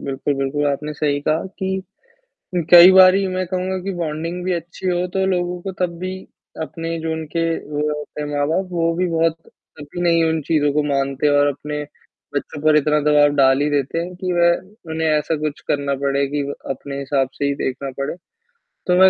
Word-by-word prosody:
बिल्कुल, 140 +1 -2
बिल्कुल। 135 +2 -1
आपने 145 +2 -2
सही 145 -1 -1
कहा 155 +3 0
कि 190 -1 -2 0.9
कई 175 +1 +10
बारी 190 +1 +7
मैं 185 0 -2
कहूँगा 185 +1 -2
कि 195 +1 -3
बॉन्डिंग 165 +1 -3
भी 185 - 0
अच्छी 170 +2 -5
हो 180 0 +1
तो 190 - +1
लोगों 180 -1 -1
को 195 - -4
तब 175 -2 -1
भी 185 +1 -4 0.5
अपने 165 +1 -4
जो 160 0 -2
उनके 160 +1 -3 0.3
वो 150 0 -2 0.2
होते 150 0 -8
हैं 150 - -4
माँ-बाप, 160 +6 0
वो 165 -1 +1
भी 180 +1 +1
बहुत 165 0 +1 0.4
कभी 145 +4 -8
नहीं 170 -1 +3
उन 160 0 +1
चीज़ों 145 -1 +1
को 150 +1 +2
मानते 140 0 0
और 145 - +4
अपने 150 +1 -4 0.5
बच्चों 145 - -4
पर 155 0 +5
इतना 150 0 +3
दबाव 150 0 +5
डाल 135 -1 +4
ही 145 - +2
देते 145 +2 0
हैं 175 +2 -4
कि 185 0 -2
वह 175 +2 0
उन्हें 160 0 0
ऐसा 155 +1 +1
कुछ 150 -1 -3
करना 140 -1 0
पड़े 140 0 +1
कि 145 +1 -1
व 140 0 -4 0.2
अपने 140 +1 -5
हिसाब 135 -1 0
से - - -3
ही 140 0 +1
देखना 135 0 -3
पड़े, 140 - -2 0.7
तो 180 - +4
मैं 190 0 +8
155 Hz, 200 wpm, -20 LUFS, 145-175 Hz, 0.9 s, कई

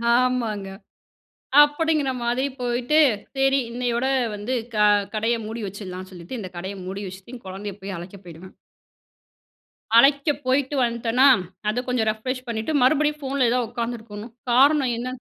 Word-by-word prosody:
ஆமாங்க. 240 -5 0 1.0
அப்படிங்கிற 295 -1 +1
மாதிரி 240 +3 0 0.2
போயிட்டு, 245 +5 +1 0.4
சரி 270 0 +3
இன்னையோட 245 +1 -1 0.3
வந்து 210 +5 -4 0.2
க - - -2 0.4
கடைய 225 +2 +1
மூடி 225 +2 -5
வச்சிடலாம்ன்னு 185 -1 -8
சொல்லிட்டு 175 +7 -8
இந்த 190 -4 -6
கடையை 190 +3 -5
மூடி 195 +2 -5
வச்சுட்டு 190 +6 -11
என் 240 - -13
கொழந்தையை 195 +1 -6
போய் 195 -1 -5
அழைக்க 180 +4 -9
போயிடுவேன். 175 +2 -12 1.4
அழைக்க 280 +4 +5 0.2
போயிட்டு 265 +2 +1
வன்ட்டனா, 235 +2 +2 0.4
அத 235 +4 -1
கொஞ்சம் 250 -3 0
ரெஃப்ரெஷ் 255 +4 -5
பண்ணிட்டு 225 +6 -2
மறுபடியும் 300 +3 +3
ஃபோன்ல 270 -2 +1
ஏதாவது 245 -2 0
உட்காந்துருக்கணும். 230 -2 -6 0.2
காரணம் 270 0 +4
என்ன 240 +2 -4
240 Hz, 135 wpm, -23 LUFS, 205-260 Hz, 1.4 s, அழைக்க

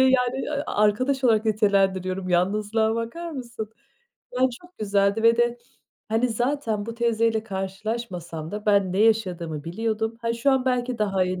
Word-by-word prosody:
yani, 260 +1 +2 0.2
arkadaş 255 +6 +1
olarak 220 -2 +4
nitelendiriyorum. 195 -3 +1
Yalnızlığa 210 +5 +1
bakar 330 +10 -4
mısın? 235 -6 -6 0.6
Ya, 250 - -3 0.2
çok 355 0 -19
güzeldi 200 +1 +1
ve 230 0 +5
de, 240 0 +1 0.5
hani, 225 +3 +2
zaten 230 -3 -1
bu 230 - -5
teyzeyle 230 -1 +1
karşılaşmasam 190 -5 -5
da 210 +1 -6
ben 200 -3 +3
ne 190 - -1
yaşadığımı 180 -9 +1
biliyordum. 220 +5 -2
Ha, 230 0 0
şu 235 +4 +1
an 265 -1 +2
belki 250 -2 0
daha 195 -3 +1
iyi 185 0 -3
220 Hz, 145 wpm, -24 LUFS, 195-235 Hz, 0.6 s, ve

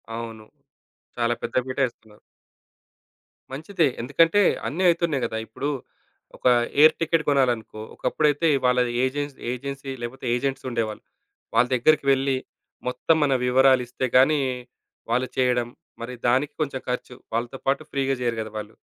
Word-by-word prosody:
అవును. 115 -2 -7 0.7
చాలా 120 0 +1
పెద్ద 120 - -4
పీటే 130 +1 -1
ఏస్తున్నారు. 110 -3 -17 1.3
మంచిదే. 160 +3 0
ఎందుకంటే 165 +10 +3 0.3
అన్నీ 180 +5 -2
అవుతున్నాయి 170 -6 +1
కదా! 110 - -3
ఇప్పుడు, 140 +6 -4 0.7
ఒక - - -21 0.4
ఎయిర్ 155 +1 +7
టికెట్ 165 -1 +1
కొనాలనుకో, 120 -6 +1
ఒకప్పుడైతే 150 +1 +1 0.2
వాళ్ళ 125 0 +3 0.2
ఏజెన్సీ 145 +2 -2
ఏజెన్సీ 135 +2 -5
లేకపోతే 120 +3 -6
ఏజెంట్సుండేవాళ్ళు. 120 -4 -3 0.5
వాళ్ళ 120 +2 +5
దగ్గరికి 145 +4 +3
వెళ్లి, 135 0 +1 0.5
మొత్తం 145 +6 +2
మన 140 -2 +2
వివరాలిస్తే 130 0 +3
గాని, 135 +4 +5 0.7
వాళ్ళు 125 +2 +1
చేయడం, 125 -2 +2 0.3
మరి 120 +2 -5
దానికి 135 +5 +2
కొంచెం 135 -3 -2
ఖర్చు, 125 0 -4 0.2
వాళ్ళతో 120 +3 -2
పాటు 135 +3 +2
ఫ్రీ‌గా 135 -1 0
చెయ్యరు 120 -2 -1
కదా 110 -1 -7
వాళ్ళు. 105 +1 -7
130 Hz, 125 wpm, -24 LUFS, 120-145 Hz, 1.3 s, ఎయిర్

